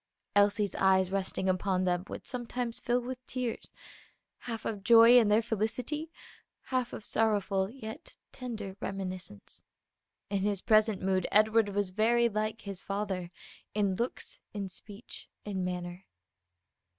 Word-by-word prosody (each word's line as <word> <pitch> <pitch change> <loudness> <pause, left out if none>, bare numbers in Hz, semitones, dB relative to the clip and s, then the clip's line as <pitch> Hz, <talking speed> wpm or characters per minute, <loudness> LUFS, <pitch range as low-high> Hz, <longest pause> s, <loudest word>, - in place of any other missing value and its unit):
Elsie's 205 -1 +3
eyes 190 -1 +4
resting 190 -1 -1
upon 185 0 +1
them 180 -1 +1
would - - -7
sometimes 245 -1 -3
fill 245 0 +1
with 255 +1 -6
tears 250 -3 -3 0.7
half 230 -3 -6
of 205 -3 -3
joy 230 +3 +8
in 235 -3 +7
their 210 +2 +4
felicity, 240 +8 -2 0.6
half 255 -2 0
of - - -7
sorrowful 200 -3 +1
yet 220 -2 -9 0.2
tender 220 -7 -6
reminiscence. 185 - -6 0.7
In 200 - +1
his 200 -1 0
present 215 -2 +3
mood 190 -1 +1
Edward 215 0 +4
was 200 -1 0
very 235 +4 +3
like 215 0 -2
his 195 -2 -4
father 195 -3 -3 0.5
in 200 -2 +2
looks, 235 +6 -3 0.2
in 200 -2 -3
speech, 205 +4 -10 0.2
in 195 -3 -2
manner. 180 +1 -4
205 Hz, 135 wpm, -31 LUFS, 190-230 Hz, 0.7 s, joy